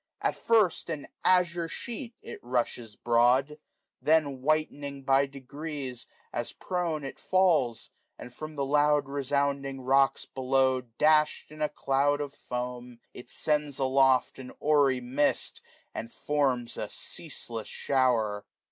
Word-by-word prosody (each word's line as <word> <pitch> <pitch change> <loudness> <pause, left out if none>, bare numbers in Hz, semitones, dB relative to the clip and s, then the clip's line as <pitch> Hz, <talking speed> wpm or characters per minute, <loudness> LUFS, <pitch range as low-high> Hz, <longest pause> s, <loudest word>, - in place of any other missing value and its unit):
At - - 0
first, 215 -8 +2
an 155 -3 -4 0.2
azure 175 -2 +3
sheet, 235 +6 -6
it - - -8
rushes 120 -3 -2
broad; 125 +5 +2 0.4
Then 150 -4 +2
whitening 145 -1 -1
by 135 +1 +3
degrees, 135 -1 -6 0.3
as 120 - -3
prone 170 -5 -2
it 135 - -7
falls, 170 -11 +2 0.3
595 - - -9
And 125 - -12
from 155 0 -7
the 140 -1 -1
loud 145 0 +3
resounding 140 -1 -1
rocks 135 +1 +3
below 130 0 +1
Dash'd 150 +7 +2
in 155 - -12
^ 150 -1 -1
cloud 140 +2 +2
of 145 -1 -4
foam, 125 -1 -6 0.2
it 125 - -10
sends 150 -2 0
aloft 135 -1 +3
A 130 -1 -8
hoary 140 -4 +3
mist, 135 +4 0 0.3
and 115 - -6
forms 135 -5 0
a - - -4
ceaseless 115 -2 -4
shower. 110 -6 0
140 Hz, 130 wpm, -28 LUFS, 125-150 Hz, 0.4 s, azure